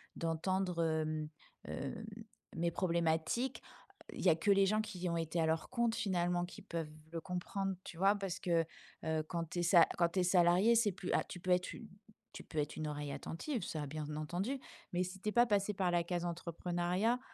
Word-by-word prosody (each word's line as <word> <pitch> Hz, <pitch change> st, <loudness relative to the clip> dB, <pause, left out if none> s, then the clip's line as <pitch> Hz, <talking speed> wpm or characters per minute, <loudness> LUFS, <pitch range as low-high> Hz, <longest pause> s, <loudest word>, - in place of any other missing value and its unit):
d'entendre, 170 Hz, +1 st, 0 dB
hem 155 Hz, -1 st, 0 dB, 0.4 s
hem, 140 Hz, +10 st, -4 dB, 0.5 s
mes 170 Hz, +1 st, +1 dB
problématiques, 170 Hz, +7 st, 0 dB, 0.5 s
il -, -, -6 dB
y 185 Hz, -, +5 dB
a 160 Hz, -, +6 dB
que 165 Hz, +5 st, +2 dB
les 195 Hz, 0 st, +6 dB
gens 215 Hz, +2 st, +3 dB
qui 185 Hz, -5 st, -4 dB
ont 170 Hz, -, 0 dB
été 165 Hz, +1 st, -1 dB
à 160 Hz, -, +3 dB
leur 160 Hz, 0 st, 0 dB
compte 235 Hz, -2 st, +1 dB
finalement 175 Hz, -2 st, +1 dB
qui 175 Hz, -, -10 dB
peuvent 165 Hz, -2 st, -4 dB, 0.2 s
le 165 Hz, -, -3 dB
comprendre, 190 Hz, +2 st, -2 dB
tu 165 Hz, -, -9 dB
vois? 195 Hz, +3 st, +5 dB
Parce 195 Hz, -3 st, -3 dB
que, 170 Hz, -3 st, +2 dB, 0.4 s
heu, 160 Hz, -1 st, 0 dB
quand 170 Hz, 0 st, -2 dB
tu 175 Hz, -, -3 dB
es -, -, +1 dB
sa 170 Hz, -1 st, +7 dB
quand 170 Hz, -1 st, +4 dB
tu 185 Hz, -, -1 dB
es -, -, +3 dB
salariée 180 Hz, +5 st, +5 dB
c'est 225 Hz, -2 st, +4 dB
plus 180 Hz, 0 st, -5 dB
a -, -, +3 dB
tu 180 Hz, -, -8 dB
peux 180 Hz, +1 st, -1 dB
être 180 Hz, 0 st, +2 dB
u 225 Hz, -, -9 dB, 0.5 s
tu -, -, -8 dB
peux 160 Hz, -, -9 dB
être 145 Hz, -, -1 dB
une 155 Hz, -1 st, -3 dB
oreille 145 Hz, -1 st, -3 dB
attentive 235 Hz, -, -3 dB
ça 150 Hz, -3 st, -3 dB
bien 150 Hz, +1 st, -4 dB
entendu, 180 Hz, -, -2 dB, 0.3 s
mais 180 Hz, -, +2 dB
si 185 Hz, +1 st, -6 dB
tu 210 Hz, -, -1 dB
es -, -, -1 dB
pas 240 Hz, +2 st, +6 dB
passé 205 Hz, 0 st, +2 dB
par 190 Hz, -2 st, +1 dB
la 175 Hz, -1 st, +2 dB
case 175 Hz, 0 st, -2 dB
entrepreneuriat, 175 Hz, +6 st, 0 dB
175 Hz, 210 wpm, -35 LUFS, 165-195 Hz, 0.5 s, sa